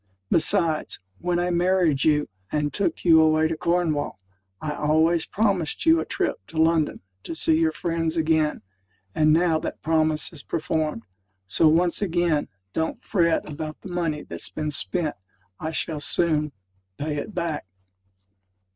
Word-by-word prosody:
Besides, 165 Hz, -2 st, +2 dB, 0.2 s
when 175 Hz, 0 st, 0 dB
I 175 Hz, 0 st, 0 dB
married 175 Hz, -4 st, +2 dB
you, 150 Hz, -2 st, +3 dB, 0.2 s
and 150 Hz, -1 st, -1 dB
took 200 Hz, -, -1 dB
you 160 Hz, -2 st, +7 dB
away 155 Hz, 0 st, +4 dB
to 165 Hz, -, -2 dB
Cornwall, 165 Hz, -, 0 dB, 0.4 s
I 155 Hz, -, -3 dB
always 160 Hz, +3 st, +2 dB
promised 195 Hz, -, 0 dB
you 325 Hz, 0 st, +6 dB
a -, -, -2 dB
trip -, -, -1 dB
to 165 Hz, -, -8 dB
London 160 Hz, -1 st, +2 dB, 0.2 s
to 165 Hz, -, -6 dB
see 160 Hz, 0 st, +3 dB
your 160 Hz, -1 st, +3 dB
friends 165 Hz, 0 st, -2 dB
again; 155 Hz, -1 st, +1 dB, 0.5 s
and 155 Hz, 0 st, +3 dB
now 165 Hz, 0 st, +3 dB
that 160 Hz, -, -6 dB
promise 155 Hz, 0 st, +1 dB
is 150 Hz, -, -7 dB
performed. 155 Hz, -6 st, -2 dB, 0.4 s
So, 95 Hz, -, +3 dB
once 170 Hz, +4 st, +3 dB
again, 175 Hz, -5 st, +1 dB, 0.3 s
don't 160 Hz, 0 st, -2 dB
fret 170 Hz, -5 st, +1 dB
about 155 Hz, 0 st, -6 dB
the 190 Hz, -, -9 dB
money 165 Hz, -4 st, -1 dB
that's -, -, -6 dB
been 155 Hz, -1 st, -3 dB
spent: 155 Hz, +3 st, -1 dB, 0.4 s
I 160 Hz, -, -3 dB
shall 160 Hz, -1 st, -2 dB
soon 150 Hz, 0 st, +1 dB, 0.5 s
pay 150 Hz, 0 st, -3 dB
it 210 Hz, +8 st, -5 dB
back. 170 Hz, -, -3 dB
160 Hz, 150 wpm, -24 LUFS, 155-170 Hz, 0.5 s, you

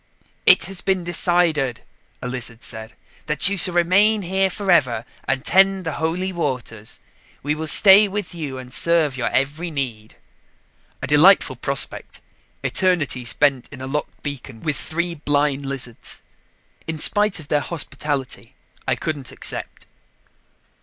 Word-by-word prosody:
"It -, -, +6 dB
has 190 Hz, -2 st, -6 dB
been 190 Hz, -1 st, 0 dB
decided," 170 Hz, -7 st, +1 dB, 0.4 s
a -, -, -3 dB
lizard 120 Hz, -2 st, -6 dB
said, 110 Hz, -1 st, -5 dB, 0.3 s
"that 150 Hz, +5 st, +3 dB
you 200 Hz, -, -1 dB
shall 180 Hz, -1 st, +3 dB
remain 200 Hz, +5 st, +3 dB
here 190 Hz, +2 st, +1 dB
forever 155 Hz, -, +1 dB, 0.2 s
and 135 Hz, +1 st, -2 dB
tend 195 Hz, -1 st, +3 dB
the 160 Hz, -, -2 dB
Holy 180 Hz, +4 st, -1 dB
Waters. 125 Hz, -9 st, -4 dB, 0.4 s
We 145 Hz, +2 st, 0 dB
will 160 Hz, +1 st, -4 dB
stay 200 Hz, +5 st, +7 dB
with 200 Hz, -2 st, -5 dB
you 150 Hz, -6 st, -5 dB
and 125 Hz, -1 st, -9 dB
serve 165 Hz, -3 st, +2 dB
your 130 Hz, -, -2 dB
every 145 Hz, +6 st, -1 dB
need." 120 Hz, -8 st, -5 dB, 0.9 s
A -, -, 0 dB
delightful 165 Hz, +7 st, +5 dB
prospect, -, -, -2 dB, 0.4 s
eternity 165 Hz, -10 st, +1 dB
spent 135 Hz, +1 st, +1 dB
in 140 Hz, -, -10 dB
a 130 Hz, -, -6 dB
locked 150 Hz, +3 st, -5 dB
beacon 135 Hz, -5 st, -7 dB
with 155 Hz, -2 st, -1 dB
three 170 Hz, +2 st, -3 dB
blind 145 Hz, -2 st, 0 dB
lizards. 130 Hz, -4 st, -5 dB, 0.6 s
In 160 Hz, -1 st, -3 dB
spite 205 Hz, +4 st, +3 dB
of 150 Hz, -, -13 dB
their 150 Hz, -, +2 dB
hospitality, 145 Hz, -4 st, -4 dB, 0.3 s
I -, -, +2 dB
couldn't 140 Hz, -6 st, -5 dB
accept. -, -, -6 dB
150 Hz, 140 wpm, -21 LUFS, 135-180 Hz, 0.9 s, stay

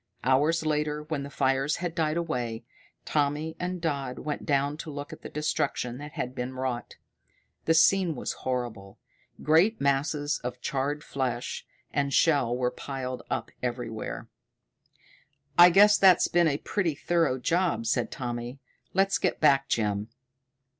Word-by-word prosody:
Hours 150 Hz, +6 st, +2 dB
later, 150 Hz, 0 st, 0 dB
when 150 Hz, -2 st, -3 dB
the 140 Hz, -, -6 dB
fires 135 Hz, +1 st, +1 dB
had 175 Hz, -1 st, -3 dB
died 160 Hz, -1 st, 0 dB
away, 125 Hz, -9 st, -3 dB, 0.4 s
Tommy 150 Hz, +2 st, 0 dB
and 180 Hz, 0 st, -3 dB
Dodd 140 Hz, -6 st, -2 dB
went 150 Hz, -, -5 dB
down 140 Hz, 0 st, +1 dB
to 160 Hz, -, -7 dB
look 145 Hz, -1 st, -6 dB
at -, -, -11 dB
the -, -, -8 dB
destruction 130 Hz, -4 st, -2 dB
that 150 Hz, 0 st, -8 dB
had 125 Hz, -, -4 dB
been 125 Hz, +1 st, -4 dB
wrought. 130 Hz, -3 st, -3 dB, 0.7 s
The 165 Hz, -, +3 dB
scene 175 Hz, 0 st, +4 dB
was -, -, -3 dB
horrible. 120 Hz, -7 st, -4 dB, 0.5 s
Great 175 Hz, +9 st, +4 dB
masses 145 Hz, +2 st, 0 dB
of 125 Hz, 0 st, -5 dB
charred 140 Hz, +3 st, -2 dB
flesh 125 Hz, -3 st, -3 dB, 0.3 s
and 140 Hz, -1 st, 0 dB
shell 135 Hz, -5 st, +3 dB
were 125 Hz, -1 st, 0 dB
piled 130 Hz, -2 st, -5 dB
up -, -, -3 dB
everywhere. 120 Hz, -3 st, -4 dB, 1.3 s
"I 175 Hz, +1 st, +9 dB
guess 205 Hz, +3 st, +6 dB
that's 190 Hz, -3 st, +6 dB
been 175 Hz, -1 st, +3 dB
a 140 Hz, -2 st, +1 dB
pretty 170 Hz, -2 st, -1 dB
thorough 165 Hz, -3 st, +1 dB
job," 170 Hz, -1 st, 0 dB
said 115 Hz, -, 0 dB
Tommy. 120 Hz, 0 st, -5 dB, 0.4 s
"Let's 195 Hz, 0 st, +3 dB
get -, -, 0 dB
back, 135 Hz, -3 st, +4 dB
Jim." 105 Hz, -1 st, 0 dB
145 Hz, 145 wpm, -27 LUFS, 125-160 Hz, 1.3 s, I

